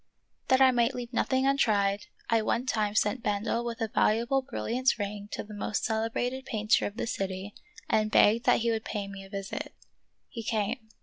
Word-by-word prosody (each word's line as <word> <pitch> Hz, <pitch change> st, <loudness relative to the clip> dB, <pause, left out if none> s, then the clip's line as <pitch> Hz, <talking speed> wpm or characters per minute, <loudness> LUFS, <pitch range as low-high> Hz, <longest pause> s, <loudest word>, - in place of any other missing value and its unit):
That 260 Hz, 0 st, +4 dB
I 260 Hz, -1 st, +7 dB
might 240 Hz, +1 st, +2 dB
leave 245 Hz, 0 st, -6 dB
nothing 260 Hz, +2 st, +1 dB
untried,! 205 Hz, -7 st, +2 dB, 0.2 s
one 230 Hz, +2 st, +1 dB
time 215 Hz, -4 st, 0 dB
sent 220 Hz, +3 st, +1 dB
Bendel 210 Hz, +3 st, -1 dB
with 235 Hz, -1 st, -5 dB
a 225 Hz, -, +1 dB
valuable 235 Hz, +6 st, +2 dB
brilliant 260 Hz, -1 st, 0 dB
ring 205 Hz, 0 st, -5 dB
to -, -, -3 dB
the 215 Hz, -, -11 dB
most 210 Hz, +1 st, -2 dB
celebrated 230 Hz, +4 st, -1 dB
painter 215 Hz, +1 st, +2 dB
of 205 Hz, -, -9 dB
the -, -, -1 dB
city 195 Hz, -1 st, -4 dB, 0.3 s
and 215 Hz, 0 st, +2 dB
begged 225 Hz, +3 st, +4 dB
that 245 Hz, -, +4 dB
he 230 Hz, 0 st, +1 dB
would 220 Hz, -1 st, -1 dB
pay 205 Hz, -2 st, -4 dB
me 195 Hz, 0 st, -8 dB
a 195 Hz, -, -13 dB
visit. 195 Hz, 0 st, -5 dB, 0.5 s
He 230 Hz, -, -7 dB
came. 220 Hz, +1 st, -2 dB
220 Hz, 185 wpm, -29 LUFS, 205-240 Hz, 0.5 s, I